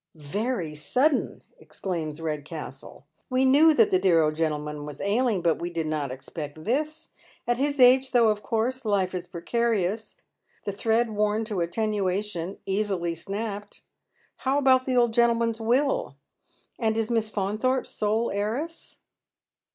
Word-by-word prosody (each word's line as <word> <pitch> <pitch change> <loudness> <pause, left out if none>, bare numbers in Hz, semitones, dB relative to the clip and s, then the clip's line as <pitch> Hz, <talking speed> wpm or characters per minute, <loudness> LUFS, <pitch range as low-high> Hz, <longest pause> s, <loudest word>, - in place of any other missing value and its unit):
" - - -48
Very 170 - -3
sudden! 255 - 0
" - - -33
exclaims 165 -5 -5
Redcastle. 150 -3 -6
" - - -37
We 255 +1 +2
knew 295 +5 +6
that 225 -5 +4
the 185 - +4
dear 175 -4 +4
old 155 0 +1
gentleman 150 -2 -2
was 150 -1 -8
ailing, 210 -2 +1
but 165 -2 +2
we 175 - -2
did 165 -2 -3
not 150 -4 -2
expect 145 +3 -7
this. 305 - -2 0.4
At 240 0 +1
his 285 0 0
age, 260 +1 +6
though, 240 -4 +4
of 210 -1 0
course, 240 +5 -1
life 200 -4 0
is 180 -1 -4
precarious, 210 +3 -1 0.5
the 200 - -1
thread 225 +3 +1
worn 210 +1 0
to 210 -4 -3
Attenuation, 195 -1 -1
easily 190 -4 -1
snapped. 205 +4 -6 0.5
How 270 +1 0
about 260 -2 +4
the 255 -1 +2
old 240 -2 +3
gentleman's 230 -1 +2
will? 280 - +1 0.6
And 220 -1 +1
is 225 +1 -1
Miss 225 -2 +1
Faunthorpe 215 +6 0
sole 215 +3 -1
heiress 235 +12 -3
210 Hz, 150 wpm, -26 LUFS, 170-240 Hz, 0.6 s, knew